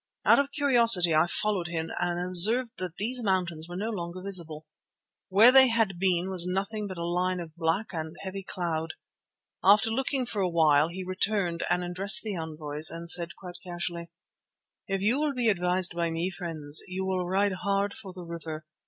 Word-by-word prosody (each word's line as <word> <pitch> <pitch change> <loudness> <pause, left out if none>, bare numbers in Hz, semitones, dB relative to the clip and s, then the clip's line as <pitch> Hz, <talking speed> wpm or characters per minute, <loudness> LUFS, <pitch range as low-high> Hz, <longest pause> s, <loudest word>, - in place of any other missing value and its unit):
Out - - +6
of 280 0 -1
curiosity 235 - +5
I 155 +2 +3
followed 195 -1 0
him 165 -1 -4
and 175 0 -1
observed 205 +8 +3
that 180 -2 -5
these 245 +6 -2
mountains 175 -5 -1
were 175 - -7
no 215 +5 -3
longer 175 -3 -6
visible. 165 -6 -4 0.6
Where 210 +6 +7
they 265 0 +7
had 225 -6 0
been 185 0 0
was 180 -2 0
nothing 200 +3 -3
but 185 -2 -8
a 170 - -4
line 180 +1 -1
of 160 -2 -9
black 170 +6 -1
and 160 0 -5
heavy 195 0 -6
cloud. 165 -4 -4 0.7
After 205 +4 +5
looking 265 +2 -1
for 210 -4 -3
a 185 - +1
while 155 -3 +3
he 185 +3 -7
returned 185 -2 -1
and 180 +1 0
addressing 195 +4 +2
the 175 - -4
envoys, 155 -1 -1 0.2
said 170 -1 0
quite 180 -2 -10
casually: 175 -1 -5 0.8
"If 195 -1 -2
you 235 +7 +2
will 300 -2 -1
be 240 -2 +1
advised 180 -2 +1
by 170 -1 -1
me, 165 +3 -2
friends, 160 -5 -2
you 190 +1 -4
will 185 -2 -2
ride 195 +2 +1
hard 200 +1 0
for 195 - -10
the 180 -1 -10
river. 160 -2 -7
180 Hz, 185 wpm, -27 LUFS, 170-200 Hz, 0.8 s, Where